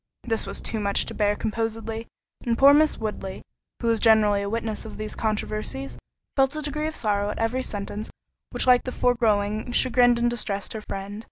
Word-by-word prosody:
This 225 -3 -1
was - - -3
too 220 - -3
much 200 -1 +1
to - - -6
bear 205 -1 +1
composedly—and 225 +1 -4
poor 280 +2 +8
Miss 310 +1 +4
Woodley, 210 -3 -5 0.4
who - - +1
was 230 -1 +2
generally 215 -3 +4
a 200 - -3
witness 225 -1 -3
of 220 - -9
these 215 0 -4
controversies, 215 - -3 0.4
felt 270 +1 +3
a 305 - -3
degree 300 +1 -2
of 315 - -5
sorrow 205 -2 0
at - - -4
every 225 +3 0
sentence 205 -1 -4 0.4
which - - +2
like 250 -1 +6
the 255 - -3
foregoing 220 -3 +1
chagrined 245 -1 +4
and 240 0 +2
distressed 205 -4 -3
her 220 - -5
friend. 200 0 -6
220 Hz, 185 wpm, -25 LUFS, 210-245 Hz, 0.4 s, poor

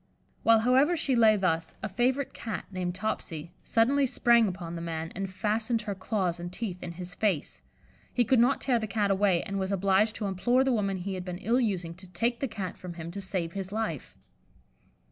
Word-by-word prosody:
While, 225 -1 +5
however, 265 +8 +4
she 270 -4 +1
lay 220 -2 +6
thus, 165 -4 0
a - - 0
favourite 250 +7 0
Cat, 225 - -5
named 180 -1 -3
"Topsy," 170 -5 -4
suddenly 270 +5 +3
sprang 235 -2 +4
upon 175 -3 -5
the 170 - -5
man, 165 -1 -4
and 195 0 -3
fastened 220 +4 -1
her 205 -2 -3
claws 185 -3 -1
and 175 0 -5
teeth 185 -3 -5
in 170 - -5
his 180 +1 -5
face. 185 -7 -1 0.5
He 245 - +2
could 250 +2 +4
not 250 +4 +4
tear 250 -3 +2
the 220 - -3
Cat 205 -1 +1
away, 195 -3 +3
and 200 -2 -3
was 190 0 -1
obliged 195 +3 +2
to 210 - -3
implore 240 +7 +2
the 270 - +1
woman 200 -4 0
he 190 +2 -4
had 185 -1 -4
been 180 -1 -5
ill 230 +6 +1
using 180 -7 -1
to 185 +2 -13
take 235 +7 0
the 275 - -1
Cat 195 -6 -5
from 180 -2 -7
him 165 0 -6
to 200 +3 -6
save 180 -3 -3
his 195 -1 -5
life. 210 - -3
200 Hz, 210 wpm, -29 LUFS, 180-230 Hz, 0.5 s, lay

